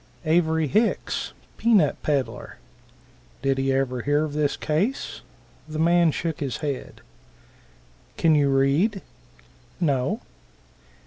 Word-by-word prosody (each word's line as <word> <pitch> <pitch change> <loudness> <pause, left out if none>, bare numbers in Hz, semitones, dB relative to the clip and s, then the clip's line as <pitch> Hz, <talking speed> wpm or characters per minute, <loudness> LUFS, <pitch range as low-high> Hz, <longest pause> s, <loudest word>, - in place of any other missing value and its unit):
Avery 160 0 +2
Hicks, 215 - 0 0.3
pea 235 0 +3
nut 155 -8 +4
peddler. 140 -4 -2 0.9
Did 135 -1 +1
he 135 0 +1
ever 130 -2 0
hear 145 +4 +1
of 150 - -6
this 150 -1 0
case? 190 - -1 0.5
The 155 0 -6
man 170 +1 +4
shook 160 +1 -3
his 140 -4 -3
head. 145 -4 -5 1.2
"Can 165 -1 +4
you 145 -2 +3
read?" 140 +10 +2 0.8
"No." 155 - 0
150 Hz, 115 wpm, -24 LUFS, 135-170 Hz, 1.2 s, nut